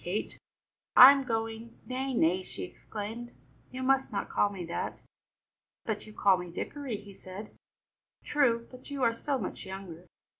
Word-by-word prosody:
Kate, 185 +5 -3 0.6
I 255 +2 +12
am 275 -1 +1
going 225 0 -3
" - - -28
"Nay, 260 +1 -2
nay," 180 -2 +3
she - - -7
exclaimed, 220 +6 -7 0.4
"you 260 +1 -5
must 270 0 +2
not 200 - -3
call 205 - +2
me 190 -3 -6
that!" 170 - -4 0.8
"But 220 -1 -3
you - - -10
call 195 -3 +4
me 180 -1 -6
Dickory," 265 +5 -4
he 200 -1 -12
said. 190 +3 -10 0.7
"True, 235 -6 +2
but 255 +2 -12
you 280 -2 -3
are 230 -1 +4
so 275 +4 -1
much - - -5
younger." 190 -3 -8
225 Hz, 165 wpm, -30 LUFS, 195-255 Hz, 0.8 s, I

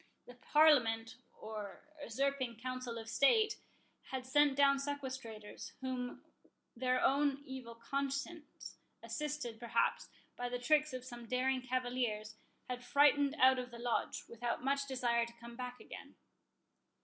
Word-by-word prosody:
The 245 - -11
Parliament, 245 -5 +4 0.2
or 215 -2 -7 0.2
usurping 260 -2 -1
Council 255 -1 -4
of 225 -1 -7
State, 280 - +4 0.5
had 260 -1 -5
sent 285 +1 +4
down 280 0 +5
sequestrators, 260 -7 -6
whom 255 -1 -4 0.5
their 255 +1 +1
own 280 +1 +2
evil 255 -3 -7
conscience, 275 +6 -4 0.2
assisted, 295 -7 -4
perhaps, 235 -1 0 0.3
by 245 0 -3
the 245 - -2
tricks 300 +4 +3
of 255 -1 -5
some 240 -2 -9
daring 255 +2 +1
cavaliers, 245 -4 -2 0.3
had 250 0 -4
frightened 285 +1 +4
out 260 0 +6
of 250 0 -5
the 235 - -10
Lodge, 240 0 -1
without 235 +1 -3
much 275 +1 +1
desire 240 -3 +1
to 235 - -13
come 235 0 -10
back 250 0 -6
again. - - -10
255 Hz, 135 wpm, -35 LUFS, 235-275 Hz, 0.5 s, out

